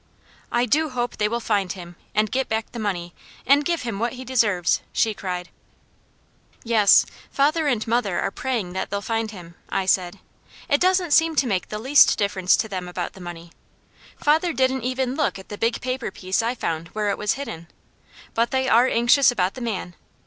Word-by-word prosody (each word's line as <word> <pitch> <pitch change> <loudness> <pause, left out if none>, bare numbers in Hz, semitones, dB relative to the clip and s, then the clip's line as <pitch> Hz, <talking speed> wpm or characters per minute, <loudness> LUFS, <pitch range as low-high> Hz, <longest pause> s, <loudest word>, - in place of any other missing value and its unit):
"I 240 +1 +2
do 305 +6 +1
hope 245 -2 -3
they 210 - +2
will 235 +2 -1
find 205 -5 0
him, 175 -2 -9 0.2
and 215 -1 +2
get 265 +2 -1
back 220 0 -2
the 235 - -7
money, 175 -5 -3 0.3
and 280 +2 +5
give 340 0 -1
him 230 -5 -4
what 235 +2 -1
he 255 0 -8
deserves!" 215 -9 +2
she 220 - +1
cried. 180 -3 -5 1.1
"Yes, 220 -4 +5 0.2
father 300 +3 +1
and 240 -6 0
mother 225 -5 0
are 195 - -1
praying 225 -7 -3
that 190 - -3
they'll 200 0 -3
find 225 0 -1
him," 175 -5 -11 0.2
I 190 - -1
said. 180 -2 +1 0.5
"It 285 - +2
doesn't 365 -2 +2
seem 325 +1 +4
to 275 - +3
make 195 -7 -1
the 210 - -4
least 265 +7 +5
difference 195 -3 +2
to - - -1
them 185 -3 -5
about 180 0 -4
the 190 - -13
money. 170 -1 -9 0.7
Father 320 +3 +2
didn't 260 -1 +1
even 255 +1 -1
look 300 -6 0
at 190 - -13
a - - -4
big 230 +1 0
paper 255 0 -3
piece 185 +3 -2
I 235 +2 -1
found 165 -7 -3
where 210 -1 0
it - - -2
was 210 -1 +1
hidden. 225 -12 -7 0.7
But 230 +1 +1
they 265 0 0
are 240 +1 +5
anxious 245 +4 +4
about 190 -6 0
the 255 - -9
man. 205 -6 -4
225 Hz, 200 wpm, -23 LUFS, 190-260 Hz, 1.1 s, and